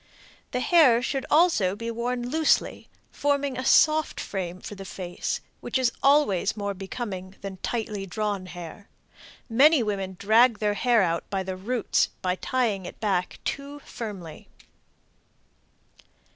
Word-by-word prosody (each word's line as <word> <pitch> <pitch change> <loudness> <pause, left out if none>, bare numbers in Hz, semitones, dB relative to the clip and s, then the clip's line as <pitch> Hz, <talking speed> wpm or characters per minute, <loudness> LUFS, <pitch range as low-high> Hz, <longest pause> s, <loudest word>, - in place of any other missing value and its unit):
The 250 - -2
hair 255 -8 +5
should 270 0 -2
also 300 - +3
be 230 +2 -4
worn 240 +1 -2
loosely, 315 +4 +1 0.2
forming 285 -2 0
a 255 - -3
soft 310 +3 +4
frame 185 -2 -4
for 210 - -8
the 195 -1 -8
face, 180 -1 -4 0.2
which - - -2
is 255 -2 +2
always 245 -9 +3
more 200 -1 -2
becoming 195 -1 -6
than 195 -1 -6
tightly 210 -2 -3
drawn 200 -1 -3
hair. 175 +3 -10 0.6
Many 270 +4 +5
women 195 -3 -3
drag 225 +4 +4
their 210 -1 0
hair 235 0 +3
out 170 -1 -1
by 195 -1 -1
the 190 0 -4
roots 225 +5 0
by 180 -1 +1
tying 220 -8 -1
back 190 -4 -1
too 280 +1 -4
firmly. 190 -9 -8
215 Hz, 135 wpm, -26 LUFS, 190-255 Hz, 0.6 s, hair